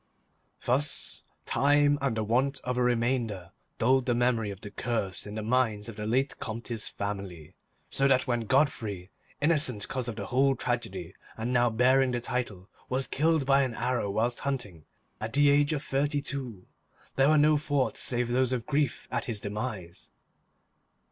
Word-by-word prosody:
Thus 135 +4 +1 0.2
time 145 +1 +3
and 135 -5 0
the 110 - 0
want 130 +6 +1
of 125 0 -2
a 125 - 0
reminder 115 -6 0 0.3
dulled 130 +2 +2
the 120 - +2
memory 120 -3 +1
of 100 -1 -8
the 105 - -8
curse 105 -5 -2
in 105 - -7
the 110 - -3
minds 110 -3 +1
of 115 - -8
the 105 0 -5
late 130 +5 0
Comte's 115 0 -3
family, 95 -6 -6 0.3
so 135 - +2
that 130 -2 +3
when 120 -4 -1
Godfrey, 110 -10 0 0.3
innocent 145 -9 +2
cause 130 -3 -3
of 115 - -4
the - - -5
whole 135 +2 +2
tragedy 115 -10 -3 0.2
and 115 +3 -2
now 120 -1 +4
bearing 130 +3 +3
the 120 - 0
title, 120 -6 -3 0.2
was 130 +1 0
killed 160 -1 +1
by 135 +1 +4
an 130 -3 -1
arrow 125 -5 -1
whilst 115 +4 0
hunting, 105 - -4 0.3
at 110 +1 -5
the 145 0 +5
age 145 +1 +3
of 150 -2 -2
thirty 145 +2 0
two, 130 -9 -5 0.5
there 135 +1 +4
were 155 - +5
no 150 +1 +5
thoughts 145 -2 0
save 120 -1 0
those 130 +1 +2
of 120 -3 -2
grief 145 -3 -1
at - - -1
his 115 -4 -3
demise. 105 -4 -6
125 Hz, 175 wpm, -28 LUFS, 110-135 Hz, 0.5 s, the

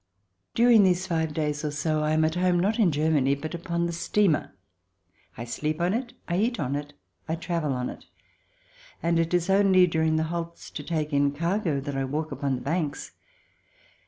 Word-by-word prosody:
During 235 -2 +6
these 185 -1 +3
five 160 -3 -1
days 150 0 -2
or 150 - 0
so 155 +1 -1
I 150 0 +1
am 155 0 +3
at 160 - 0
home, 180 0 +2
not 205 +6 +1
in 195 -7 +4
Germany, 145 -2 +2
but 155 +3 -6
upon 170 0 -2
the 170 - -2
steamer. 175 0 +1 0.9
I 115 - -5
sleep 150 +6 -3
on 175 +2 +1
it, 240 +2 -3
I 175 - 0
eat 235 +5 0
on 140 -2 -1
it, 145 0 -5 0.4
I 160 - +1
travel 165 -4 -2
on 125 -1 -2
it, - - -13 1.0
and 170 0 +2
it 165 0 0
is 175 0 +1
only 195 -1 +5
during 160 -2 +1
the 160 - +1
halts 170 +1 -5
to - - -6
take 155 -1 -3
in 140 0 +2
cargo 170 -1 0
that 140 0 -5
I 135 0 -1
walk 155 +4 -3
upon 140 -2 -1
the 125 - -6
banks. 150 0 -2
160 Hz, 195 wpm, -26 LUFS, 150-175 Hz, 1.0 s, During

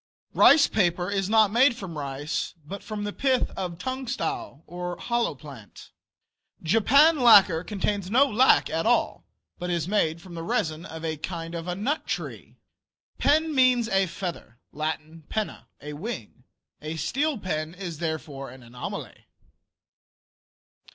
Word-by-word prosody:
Rice 285 0 +7
paper 180 -2 0
is 195 -1 -1
not 215 -2 +5
made 245 +3 +4
from 190 -7 -7
rice, 145 +3 -4
but 195 +6 -7
from 215 -1 -5
the 205 0 -4
pith 260 -2 +1
of 180 -3 -5
Tungtsau, 260 - -4
or 175 +1 -5
hollowplant. 150 - -4 0.7
Japan 280 - +5
lacquer 195 -9 +7
contains 200 -1 -2
no 255 +6 +5
lac 260 0 +4
at 165 +5 -1
all, 240 - +1 0.3
but 180 0 -4
is 170 -2 -1
made 170 -5 +1
from 180 0 -12
the 165 - -6
resin 170 -5 -2
of 160 0 -7
a 160 -1 -2
kind 165 +1 -6
of 170 0 -5
nut 275 +10 -2
tree. - - -5 0.6
Pen 310 +2 +3
means 255 -3 +4
a 195 -1 +2
feather. 170 -9 -6
(Latin. 155 +1 -5
"penna," 215 -1 -4
a 150 +1 -7
wing.) 145 - -7 0.4
A 155 +1 -5
steel 280 - -1
pen 160 -4 -3
is 175 -5 -6
therefore 155 -4 -4
an 130 0 -13
anomaly. 120 +1 -8
180 Hz, 140 wpm, -26 LUFS, 160-235 Hz, 0.7 s, Rice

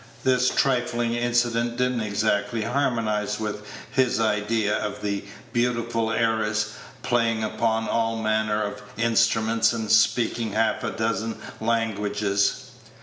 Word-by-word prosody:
This 125 -1 +3
trifling 120 -3 +1
incident 120 0 0
did 125 0 +2
n't 120 -2 -2
exactly 110 +1 0
harmonize 115 -5 0
with 105 -1 -3 0.3
his 130 -3 +2
idea 105 -1 +1
of 105 -1 -4
the 100 -1 -2 0.3
beautiful 115 -2 0
heiress, 110 -2 0 0.3
playing 115 -2 +1
upon 110 0 0
all 115 0 0
manner 110 -1 0
of 105 - -5 0.2
instruments, 115 0 +2
and 110 -2 -2
speaking 115 0 +2
half 110 0 +1
a - - -1
dozen 110 0 -2 0.2
languages. 105 -3 0
115 Hz, 120 wpm, -25 LUFS, 105-120 Hz, 0.3 s, This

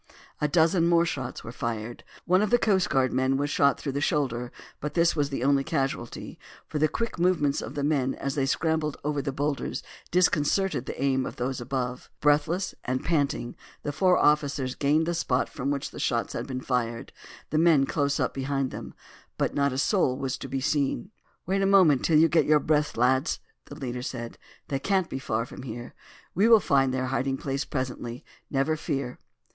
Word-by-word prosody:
A 150 - +1
dozen 165 +2 +3
more 170 0 +4
shots 130 -6 -4
were 115 - -7
fired. 115 -1 -4 0.2
One 185 +2 +4
of 210 - +1
the 240 - +5
coast 195 -6 +2
guard 130 -2 +2
men 130 +1 +2
was 145 +1 -1
shot 140 -1 +3
through 140 - -3
the 140 +2 -2
shoulder; 125 -5 0 0.3
but 150 0 -5
this 170 -1 +3
was 145 -2 0
the 135 -3 -3
only 140 0 +3
casualty, 135 -4 -3 0.3
for 150 - -4
the 155 - +4
quick 230 +4 -3
movements 170 -6 +2
of - - -7
the 145 - -2
men 140 -3 +1
as 140 - -3
they 135 -2 0
scrambled 160 0 0
over 145 -1 -1
the 140 0 -3
boulders 140 +1 -2 0.3
disconcerted 175 -3 +2
the - - -5
aim 130 -1 +1
of - - -7
those 125 +1 -3
above. 125 0 -3
Breathless 155 +6 +2
and 130 +1 -2
panting 140 -7 0 0.3
the 145 - -2
four 180 +4 +3
officers 145 -3 +2
gained 150 +4 +2
the 170 - -1
spot 130 -6 0
from 135 - -4
which 140 -1 -2
the - - -9
shots - - 0
had - - -4
been 130 -1 -4
fired, 120 -3 -2 0.4
the 155 - +2
men 160 -5 +5
close 140 0 0
up - - 0
behind 135 0 -1
them; - - -8 0.4
but - - 0
not 140 0 +2
a 130 - -4
soul 135 -4 +2
was 135 -1 -2
to - - -6
be 135 - -2
seen. 140 - 0 0.3
"Wait 195 +2 0
a 195 - +3
moment 185 -9 +5
till 160 - +4
you 160 +2 +6
get 160 -2 +2 0.2
breath, 150 -3 +1
lads," 130 +5 +2 0.3
their 145 - -10
leader 125 -4 -4
said. 120 -2 -6 0.3
"They 135 - -2
can't 190 +3 0
be 135 - -3
far 115 -4 -1
from 125 - -10
here. 120 -1 -7 0.4
We 200 +6 +3
will 230 -1 +8
find 135 -7 +2
their 130 0 -1
hiding 135 0 0
place 135 0 -3
presently, 125 -3 -4 0.2
never 140 +3 +1
fear." 140 -5 -3
140 Hz, 200 wpm, -27 LUFS, 130-155 Hz, 0.4 s, will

